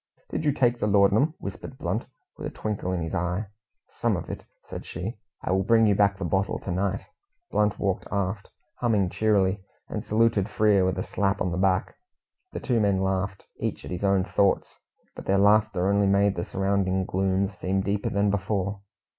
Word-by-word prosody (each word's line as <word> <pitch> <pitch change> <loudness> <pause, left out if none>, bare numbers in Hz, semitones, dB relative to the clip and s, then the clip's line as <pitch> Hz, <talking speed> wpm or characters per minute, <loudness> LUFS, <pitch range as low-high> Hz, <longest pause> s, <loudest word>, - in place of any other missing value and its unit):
"Did - - -2
you 145 - +4
take 120 -3 +2
the 105 - 0
laudanum?" 105 +10 +4
whispered 100 - -7
Blunt, - - -2 0.3
with - - -5
a - - -4
twinkle 105 -4 -3
in 90 -2 -1
his 80 - -5
eye. 90 +4 -1 0.5
"Some - - 0
of - - -6
it," - - -7 0.2
said - - -7
she. - - -6 0.2
"I - - -1
will 95 +1 +3
bring 115 +3 +4
you 105 - +4
back 100 0 +3
the 95 - -3
bottle 95 +3 0
to 95 - -6
night." 95 +2 -1 0.5
Blunt 105 -1 +2
walked 95 -2 -1
aft, 100 0 -2 0.3
humming 105 -7 +1
cheerily, 100 -3 +2 0.3
and - - -4
saluted 110 -2 +2
Frere 105 -3 +3
with 95 - 0
a 90 - -1
slap 100 +1 0
on 90 - 0
the 85 - -2
back. 95 -1 +1 0.5
The - - -4
two 120 -4 +1
men 100 -3 +2
laughed, 95 0 -1
each - - -3
at - - -7
his 90 +1 -4
own 100 -1 +3
thoughts, 100 0 +1 0.4
but - - -9
their 100 - +3
laughter 100 -2 +4
only 100 0 +3
made 100 0 +3
the 85 - -3
surrounding 95 -1 0
gloom 95 +1 +1
seem 95 -1 -2
deeper 100 +1 -1
than 100 0 +1
before. 100 0 -1
100 Hz, 195 wpm, -26 LUFS, 95-105 Hz, 0.5 s, you